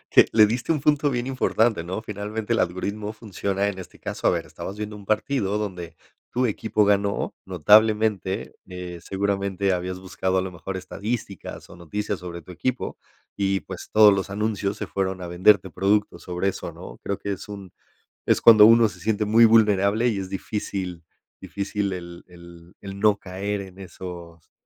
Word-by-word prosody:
Eh, -, -, +9 dB
le 110 Hz, -1 st, +7 dB
diste 120 Hz, +8 st, -1 dB
a -, -, +3 dB
un 150 Hz, -, -4 dB
punto 150 Hz, 0 st, +3 dB
bien 120 Hz, 0 st, -2 dB
importante, 120 Hz, -7 st, +1 dB
¿no? 95 Hz, +5 st, -4 dB
Finalmente 105 Hz, +2 st, -4 dB
el 115 Hz, -, +1 dB
algoritmo 100 Hz, +4 st, -2 dB
funciona 100 Hz, -2 st, -2 dB
en 100 Hz, -2 st, -3 dB
este 95 Hz, -, -11 dB
caso, -, -, -2 dB
a -, -, +5 dB
ver, -, -, -2 dB
estabas 95 Hz, -, -7 dB
viendo 105 Hz, 0 st, -5 dB
un 100 Hz, -1 st, -12 dB
partido 105 Hz, -1 st, 0 dB
donde 90 Hz, -5 st, -5 dB, 0.4 s
tu 125 Hz, +1 st, +1 dB
equipo 110 Hz, 0 st, 0 dB
ganó, 100 Hz, 0 st, +1 dB
notablemente. 105 Hz, +2 st, +3 dB
Eh, 90 Hz, -2 st, -7 dB
seguramente 100 Hz, 0 st, -1 dB
habías 90 Hz, 0 st, -2 dB
buscado 95 Hz, 0 st, -2 dB
a -, -, +1 dB
lo 95 Hz, 0 st, -5 dB
mejor 95 Hz, +2 st, -6 dB
estadísticas 100 Hz, +2 st, -5 dB
o -, -, -12 dB
noticias 100 Hz, +4 st, -4 dB
sobre 85 Hz, -1 st, -7 dB
tu 85 Hz, -, -12 dB
equipo 125 Hz, +8 st, -3 dB, 0.4 s
y, 95 Hz, -1 st, +1 dB
pues, 95 Hz, -2 st, -9 dB
todos 105 Hz, -1 st, +8 dB
los 100 Hz, 0 st, -2 dB
anuncios 105 Hz, -1 st, -1 dB
se 105 Hz, -, -5 dB
fueron 95 Hz, +2 st, -2 dB
a 90 Hz, -, -5 dB
venderte 95 Hz, +2 st, +4 dB
productos 100 Hz, +4 st, 0 dB
sobre 90 Hz, +2 st, -1 dB
eso, -, -, -6 dB
¿no?, -, -, -10 dB
creo 100 Hz, -, -2 dB
que 100 Hz, -, -4 dB
es 95 Hz, -, -9 dB
un 100 Hz, -3 st, -9 dB, 0.6 s
es -, -, +4 dB
cuando 110 Hz, -2 st, +9 dB
uno 115 Hz, 0 st, +6 dB
se 95 Hz, -, -10 dB
siente 105 Hz, +3 st, 0 dB
muy 115 Hz, +3 st, +6 dB
vulnerable 110 Hz, 0 st, +4 dB
y 110 Hz, -5 st, 0 dB
es 95 Hz, -1 st, -5 dB
difícil 95 Hz, -3 st, -4 dB, 0.4 s
difícil 100 Hz, 0 st, -3 dB
el 85 Hz, -1 st, -8 dB
el 85 Hz, -1 st, -15 dB
el 100 Hz, 0 st, -8 dB
no 105 Hz, 0 st, +4 dB
caer 100 Hz, +1 st, -4 dB
en 95 Hz, -1 st, -11 dB
esos 85 Hz, -3 st, -10 dB
100 Hz, 185 wpm, -24 LUFS, 90-105 Hz, 0.6 s, Eh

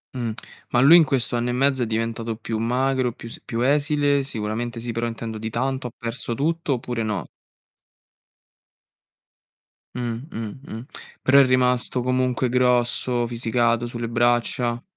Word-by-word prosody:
Mh. 120 Hz, -3 st, -2 dB, 0.4 s
Ma 120 Hz, -, +2 dB
lui 145 Hz, +6 st, +9 dB
in 170 Hz, -, +7 dB
questo 125 Hz, -4 st, 0 dB
anno 120 Hz, +1 st, -1 dB
e -, -, 0 dB
mezzo 135 Hz, 0 st, +2 dB
è 115 Hz, -, 0 dB
diventato 115 Hz, 0 st, -2 dB
più 110 Hz, 0 st, -4 dB
magro, 125 Hz, +1 st, +1 dB
più 115 Hz, -, -10 dB
s -, -, -10 dB
più 115 Hz, 0 st, -3 dB
esile? 145 Hz, +1 st, +2 dB
Sicuramente 115 Hz, -2 st, -3 dB
sì, 120 Hz, 0 st, -4 dB
però 115 Hz, +1 st, -2 dB
intendo 115 Hz, -1 st, -5 dB
di 110 Hz, +1 st, -4 dB
tanto, 130 Hz, +2 st, -2 dB
ha -, -, -9 dB
perso 115 Hz, 0 st, -4 dB
tutto 160 Hz, +1 st, 0 dB
oppure 120 Hz, -1 st, -3 dB
no? 105 Hz, -2 st, -2 dB, 2.7 s
Mh, 120 Hz, 0 st, -3 dB
mh, 110 Hz, +3 st, -6 dB
mh. 115 Hz, +3 st, -6 dB, 0.4 s
Però 140 Hz, +1 st, +6 dB
è 140 Hz, -, +7 dB
rimasto 125 Hz, 0 st, +2 dB
comunque 130 Hz, 0 st, 0 dB
grosso, 125 Hz, -1 st, +1 dB
fisicato 120 Hz, 0 st, +1 dB
sulle 120 Hz, -1 st, -4 dB
braccia. 120 Hz, 0 st, +1 dB
120 Hz, 150 wpm, -23 LUFS, 115-130 Hz, 2.7 s, lui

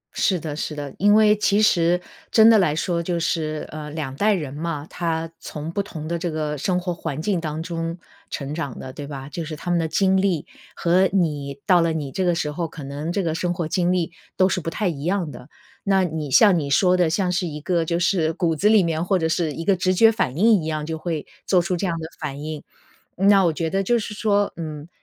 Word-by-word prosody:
是 185 Hz, -3 st, +1 dB
的 155 Hz, -2 st, -5 dB
是 155 Hz, 0 st, -4 dB
的， 145 Hz, -2 st, -6 dB
因 205 Hz, +2 st, +5 dB
为 215 Hz, -1 st, +6 dB
其 210 Hz, 0 st, +2 dB
实 175 Hz, -4 st, +3 dB, 0.3 s
真 220 Hz, -1 st, +7 dB
的 225 Hz, -2 st, +7 dB
来 155 Hz, -5 st, +2 dB
说 170 Hz, +1 st, -1 dB
就 170 Hz, 0 st, -2 dB
是， 155 Hz, -2 st, -2 dB
呃， 150 Hz, -1 st, -6 dB
两 150 Hz, -3 st, -5 dB
代 210 Hz, +6 st, +3 dB
人 150 Hz, -7 st, -3 dB
嘛， 150 Hz, -1 st, -4 dB
他 165 Hz, -1 st, -3 dB
从 155 Hz, +1 st, -6 dB
不 200 Hz, -, -1 dB
同 160 Hz, -6 st, -7 dB
的 170 Hz, +1 st, -2 dB
这 175 Hz, 0 st, -2 dB
个 155 Hz, -1 st, -2 dB
生 180 Hz, +6 st, 0 dB
活 180 Hz, -1 st, -3 dB
环 160 Hz, -4 st, -5 dB
境 180 Hz, +1 st, 0 dB
当 155 Hz, 0 st, -4 dB
中 165 Hz, 0 st, -4 dB, 0.3 s
成 140 Hz, +1 st, -4 dB
长 145 Hz, -6 st, -4 dB
的， 130 Hz, 0 st, -8 dB
对 145 Hz, 0 st, -7 dB
吧？ 135 Hz, -2 st, -7 dB
就 165 Hz, +3 st, -5 dB
是 155 Hz, 0 st, -6 dB
他 175 Hz, +4 st, -4 dB
们 175 Hz, -, +2 dB
的 160 Hz, -, 0 dB
经 190 Hz, +4 st, +2 dB
历 180 Hz, -6 st, 0 dB, 0.3 s
和 180 Hz, +2 st, +3 dB
你 150 Hz, -6 st, -1 dB
到 180 Hz, -3 st, +5 dB
了 165 Hz, -1 st, +1 dB
你 145 Hz, -4 st, -4 dB
这 190 Hz, -, -1 dB
个 175 Hz, -1 st, +2 dB
时 150 Hz, -3 st, -2 dB
候， 165 Hz, +2 st, -3 dB
可 155 Hz, -2 st, -10 dB
能 145 Hz, +4 st, -4 dB
这 195 Hz, +2 st, -1 dB
个 160 Hz, -2 st, -1 dB
生 175 Hz, +1 st, -1 dB
活 170 Hz, -2 st, -2 dB
经 175 Hz, +2 st, +1 dB
历 175 Hz, -2 st, 0 dB, 0.3 s
都 185 Hz, -, +5 dB
是 185 Hz, -, -1 dB
不 165 Hz, -, -3 dB
太 200 Hz, +3 st, -1 dB
一 150 Hz, -5 st, -3 dB
样 175 Hz, -2 st, -1 dB
的。 125 Hz, 0 st, -12 dB, 0.4 s
那 195 Hz, -1 st, +3 dB
你 160 Hz, -4 st, -3 dB
像 190 Hz, -, +6 dB
你 140 Hz, -, -3 dB
说 180 Hz, +6 st, +4 dB
的， 175 Hz, -3 st, +3 dB
像 180 Hz, +1 st, 0 dB
是 175 Hz, 0 st, 0 dB
一 150 Hz, -2 st, -6 dB
个 170 Hz, +1 st, 0 dB
就 170 Hz, +1 st, -1 dB
是 170 Hz, -2 st, +1 dB
骨 165 Hz, -2 st, 0 dB
子 205 Hz, +7 st, +3 dB
里 215 Hz, -4 st, +6 dB
面 165 Hz, -1 st, -1 dB
或 190 Hz, +2 st, +2 dB
者 160 Hz, -2 st, 0 dB
是 160 Hz, -1 st, 0 dB
一 165 Hz, -, -6 dB
个 200 Hz, -, +4 dB
直 185 Hz, +1 st, +1 dB
觉 225 Hz, +4 st, +6 dB
反 150 Hz, -, -1 dB
应 215 Hz, -1 st, +5 dB
一 155 Hz, -, -6 dB
样， 155 Hz, -1 st, -2 dB
就 160 Hz, +1 st, -3 dB
会 160 Hz, -4 st, -3 dB, 0.2 s
做 185 Hz, -, +4 dB
出 180 Hz, +1 st, 0 dB
这 185 Hz, +2 st, -1 dB
样 170 Hz, -, -1 dB
的 160 Hz, -, -5 dB
反 145 Hz, -1 st, -5 dB
应， 155 Hz, -1 st, -5 dB, 0.5 s
那 195 Hz, +1 st, +5 dB
我 165 Hz, -, +3 dB
觉 160 Hz, +1 st, -2 dB
得 195 Hz, +2 st, +1 dB
就 240 Hz, +4 st, +2 dB
是 215 Hz, -1 st, -5 dB
说， 205 Hz, -1 st, +1 dB
嗯， 155 Hz, -2 st, -6 dB
170 Hz, 270 characters per minute, -23 LUFS, 155-185 Hz, 0.5 s, 真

